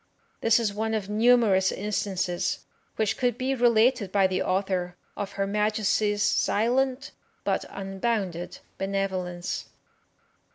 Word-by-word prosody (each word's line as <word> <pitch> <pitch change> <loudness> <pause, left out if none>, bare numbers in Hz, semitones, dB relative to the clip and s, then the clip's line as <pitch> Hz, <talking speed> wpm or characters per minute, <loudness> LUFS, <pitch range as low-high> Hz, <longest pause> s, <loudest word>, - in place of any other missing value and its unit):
This 230 +1 +4
is 215 -3 -1
one 220 +2 -1
of 205 -2 -3
numerous 215 -4 +4
instances 190 -3 -2 0.3
which 220 -1 0
could 245 -3 +1
be 260 +1 0
related 235 -3 +3
by 195 -1 +3
the 185 0 0
author 185 -2 -1 0.2
of 205 -1 -5
her 195 0 -1
Majesty's 210 0 +1
silent, 255 +8 +1 0.3
but - - 0
unbounded 195 -2 -3 0.2
benevolence. 190 -2 -2
205 Hz, 115 wpm, -26 LUFS, 190-230 Hz, 0.3 s, This